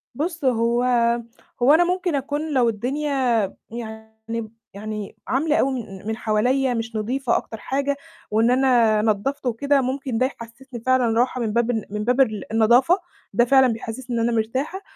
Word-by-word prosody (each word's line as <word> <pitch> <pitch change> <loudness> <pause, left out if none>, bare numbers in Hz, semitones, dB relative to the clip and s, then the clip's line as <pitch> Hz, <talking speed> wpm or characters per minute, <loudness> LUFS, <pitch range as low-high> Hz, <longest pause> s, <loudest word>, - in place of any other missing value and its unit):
بُصّ، 325 0 -3
هو 235 0 +2 0.8
هو 275 +5 +6
أنا 340 +2 +6
ممكن 360 -3 0
أكون 290 +3 -2
لو 245 -3 +3
الدنيا 260 +2 0 0.3
يعني 220 0 -7 0.2
يعني 210 0 -6
عاملة 300 +4 +1
أوي 270 - +2
من 205 -5 -7
من 220 0 -2
حواليّا 250 +4 +1
مش 225 -1 -4
نضيفة 245 +4 0
أكتر 225 - -6
حاجة، 280 +5 -1 0.4
وإن 225 +3 +3
أنا 240 -5 +3
نضّفت 225 +6 -1
وكده 275 +4 +2
ممكن 260 -2 -2
ده 255 - +3
يحسسني 240 0 -8
فعلًا 245 -3 +3
راحة 250 0 +1
من 215 -2 -1
باب 235 +1 +2
ال 220 -3 -2
من 210 +1 -3
باب 250 +3 +2
ال 215 -3 -1
النضافة، 240 - +4 0.4
ده 240 +4 +4
فعلًا 265 0 +5
بيحسِّسني 235 +2 -6
إن - - 0
أنا - - 0
مرتاحة، 265 - -2
245 Hz, 165 wpm, -22 LUFS, 225-270 Hz, 0.8 s, هو